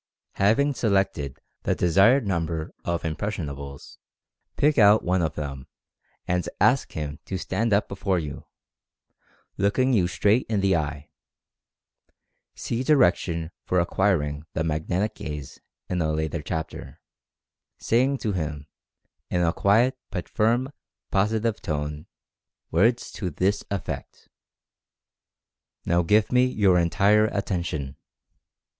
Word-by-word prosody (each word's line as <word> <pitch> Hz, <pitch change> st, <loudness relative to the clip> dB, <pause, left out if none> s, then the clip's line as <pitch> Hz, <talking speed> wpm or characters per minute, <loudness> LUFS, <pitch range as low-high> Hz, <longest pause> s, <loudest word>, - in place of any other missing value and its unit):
Having 125 Hz, +9 st, +3 dB
selected 95 Hz, -, 0 dB, 0.2 s
the -, -, 0 dB
desired 100 Hz, -, +4 dB
number 85 Hz, -4 st, -2 dB
of 85 Hz, -1 st, -2 dB
"impression 85 Hz, +1 st, -3 dB
able 70 Hz, 0 st, -7 dB
9," 70 Hz, -, -12 dB, 0.8 s
pick 150 Hz, -2 st, +3 dB
out 105 Hz, 0 st, +6 dB
one 90 Hz, 0 st, +1 dB
of 80 Hz, -2 st, -1 dB
them, 70 Hz, -3 st, -6 dB, 0.6 s
and 90 Hz, -1 st, 0 dB
ask -, -, +3 dB
him 75 Hz, -1 st, -5 dB
to 95 Hz, -, -3 dB
stand 105 Hz, +5 st, -1 dB
up 100 Hz, +1 st, +3 dB
before 100 Hz, -1 st, -1 dB
you, 75 Hz, -5 st, -5 dB, 1.1 s
looking 130 Hz, +7 st, +2 dB
you 95 Hz, -6 st, +3 dB
straight 105 Hz, +6 st, +2 dB
in 105 Hz, -3 st, +1 dB
the 95 Hz, -1 st, +3 dB
eye 75 Hz, -2 st, -3 dB, 1.4 s
(see 120 Hz, +1 st, -3 dB
di 155 Hz, -, +4 dB
rection 85 Hz, -, +1 dB
for 90 Hz, -, +1 dB
acquiring 85 Hz, -5 st, 0 dB
the 80 Hz, -, -1 dB
"Magnetic 80 Hz, +6 st, -1 dB
Gaze" 75 Hz, -3 st, -7 dB, 0.3 s
in 90 Hz, -1 st, -1 dB
a 80 Hz, -1 st, +1 dB
later 80 Hz, +1 st, -2 dB
chapter), 80 Hz, +2 st, -6 dB, 0.8 s
saying 130 Hz, +4 st, +2 dB
to 110 Hz, -, 0 dB
him, 75 Hz, -6 st, -3 dB, 0.6 s
in 90 Hz, -1 st, +1 dB
a 85 Hz, 0 st, +2 dB
quiet 120 Hz, +8 st, +3 dB
but 90 Hz, -3 st, -5 dB
firm, 120 Hz, +5 st, +1 dB, 0.4 s
positive 110 Hz, +2 st, +1 dB
tone 75 Hz, -1 st, -4 dB, 0.6 s
words 115 Hz, +8 st, +2 dB
to 95 Hz, -4 st, -4 dB
this 95 Hz, +6 st, 0 dB
effect: 100 Hz, -2 st, -6 dB, 1.6 s
"Now 85 Hz, +1 st, +3 dB
give 105 Hz, +5 st, +2 dB
me 125 Hz, 0 st, +5 dB
your 100 Hz, -7 st, +3 dB
entire 100 Hz, +5 st, +3 dB
attention. 85 Hz, -10 st, -3 dB
90 Hz, 125 wpm, -25 LUFS, 80-105 Hz, 1.6 s, out